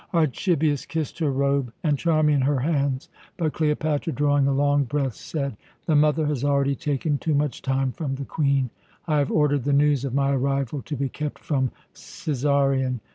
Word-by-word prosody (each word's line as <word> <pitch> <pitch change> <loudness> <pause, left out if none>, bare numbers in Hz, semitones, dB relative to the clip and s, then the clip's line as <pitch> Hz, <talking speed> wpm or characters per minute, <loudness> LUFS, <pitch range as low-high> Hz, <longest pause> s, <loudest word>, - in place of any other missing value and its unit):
Archibius 155 -1 +1
kissed 160 -2 -3
her 155 -3 +1
robe, 140 -2 0
and 150 -3 +2
Charmian 150 -2 +2
her 140 +2 +2
hands; 140 -3 0 0.3
but 160 -4 -1
Cleopatra, 155 0 0
drawing 145 -2 +2
a - - +2
long 145 +1 +2
breath, 135 -1 -1
said: 140 -3 -4 0.3
"The 160 - +2
mother 150 +1 +3
has 145 -3 -1
already 140 -1 +2
taken 145 0 -1
too 155 -2 0
much 145 -3 -1
time 135 0 0
from 135 -1 -3
the 140 0 -5
Queen. 140 -5 0 0.3
I 155 -3 +1
have 140 - 0
ordered 145 -3 +2
the 145 - +1
news 145 -1 +3
of 135 -2 -3
my 140 0 +2
arrival 135 0 -1
to 150 - -4
be 140 +1 -1
kept 150 +2 -5
from 130 -4 -1 0.2
Cæsarion. 135 -5 0
145 Hz, 180 wpm, -24 LUFS, 135-150 Hz, 0.3 s, mother